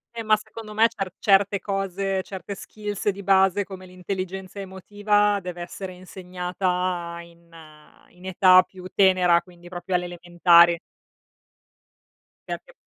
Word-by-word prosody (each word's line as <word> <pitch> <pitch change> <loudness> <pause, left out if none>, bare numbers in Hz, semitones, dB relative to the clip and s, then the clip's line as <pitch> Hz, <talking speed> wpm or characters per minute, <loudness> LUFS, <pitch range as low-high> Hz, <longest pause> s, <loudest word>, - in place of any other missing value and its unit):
Ehm, 230 - -5
ma 215 0 +5
secondo 215 0 -11
me 225 +2 +5
cer 195 -3 -5
certe 200 0 +3
cose, 195 -1 -2
certe 190 +1 -7
skills 205 0 -4
di 200 0 -4
base 195 0 +3
come 190 -1 -11
l'intelligenza 185 +1 -6
emotiva 205 +2 0
deve 180 -1 -7
essere 185 +2 -7
insegnata 180 -1 -3
in 170 0 -18 0.6
in 180 +1 -17
età 185 0 +6
più 185 0 -12
tenera, 185 -3 +4
quindi 175 -1 -16
proprio 175 +1 -4
alle 180 0 0
elementari. 175 -1 +4 1.7
Perchè - - -7
185 Hz, 125 wpm, -24 LUFS, 180-200 Hz, 1.7 s, età